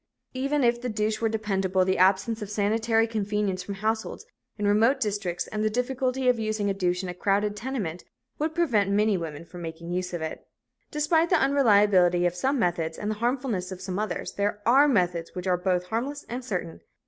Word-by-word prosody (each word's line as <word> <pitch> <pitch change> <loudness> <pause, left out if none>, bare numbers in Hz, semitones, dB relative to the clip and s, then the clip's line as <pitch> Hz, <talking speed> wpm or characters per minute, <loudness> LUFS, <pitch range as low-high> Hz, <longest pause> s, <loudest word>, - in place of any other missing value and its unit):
Even 275 +2 0
if 240 0 +2
the 250 - -3
douche 215 0 -1
were 225 - +2
dependable, 195 -4 0
the 190 -1 +1
absence 195 +4 +3
of 205 - -5
sanitary 225 +2 +2
convenience 210 -3 -1
from 200 +2 -6
households 220 +3 -2 0.3
in 210 - -2
remote 225 +7 +3
districts 205 -6 -2
and 215 0 -3
the 215 - +2
difficulty 255 +2 -1
of 250 -2 +3
using 215 -2 -1
a - - 0
douche 180 -1 -1
in 180 -1 -4
crowded 205 +3 0
tenements 210 -8 -4 0.4
would 310 +1 -1
prevent 235 - +2
many 210 +1 +3
women 165 -2 -5
from 175 +1 -10
making 165 +1 -7
use 180 0 -2
of 175 -3 -4
it. 160 - -6 0.4
Despite 320 +3 +2
the 355 - +4
unreliability 205 -10 +4
of 175 - +1
some 265 +10 0
methods 170 -6 -1
and 210 +1 -2
the - - -2
harmfulness 240 -7 -1
of 185 - -6
some 185 +1 -4
others, 210 -5 -3
there 205 +1 -1
are 270 +6 +6
methods 175 - 0
which 180 0 -5
are 185 -1 +3
both 180 0 0
harmless 260 +9 -3
and 245 +2 -5
certain. 180 - -4
210 Hz, 195 wpm, -26 LUFS, 185-235 Hz, 0.4 s, are